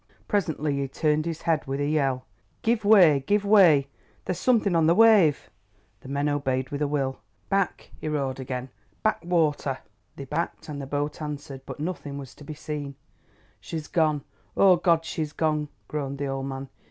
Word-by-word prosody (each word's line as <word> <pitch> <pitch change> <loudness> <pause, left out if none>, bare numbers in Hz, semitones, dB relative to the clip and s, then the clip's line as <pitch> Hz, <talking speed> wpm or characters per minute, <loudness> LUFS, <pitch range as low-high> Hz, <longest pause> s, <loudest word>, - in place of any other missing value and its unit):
Presently 155 -8 0
he 140 0 -1
turned 155 +3 0
his 165 -2 -4
head 160 -5 0
with 135 +1 -2
a 145 - 0
yell. 135 -4 0 0.4
"Give 225 -1 +1
way—give 200 -1 +5
way! 180 -9 +6 0.4
there's 185 - -2
something 220 -7 +2
on 165 -1 +4
the 170 - +5
wave." 210 -10 +5 0.5
The 130 - -12
men 140 +1 0
obeyed 130 -3 -1
with 145 0 -3
a 150 - +2
will. 135 -2 -1 0.3
"Back," 195 -2 -1
he - - -4
roared 135 -3 -2
again—"back 130 - -4
water!" 155 -6 +1 0.4
They 140 - -7
backed, 160 +5 -3
and 145 -1 -5
the 135 - -6
boat 145 +2 -3
answered, 145 -3 -6
but - - -7
nothing 150 -3 -4
was 135 -2 -8
to - - -14
be 150 +1 -7
seen. 145 -2 -5 0.6
"She's 160 -2 -6
gone! 155 -4 +1 0.3
Oh, 190 -2 +6
Goad, 170 -1 +2
she's 155 -2 -3
gone!" 155 -2 0 0.2
groaned 140 -2 -4
the 140 - -2
old 135 0 -3
man. 135 0 -6
150 Hz, 175 wpm, -26 LUFS, 140-170 Hz, 0.6 s, way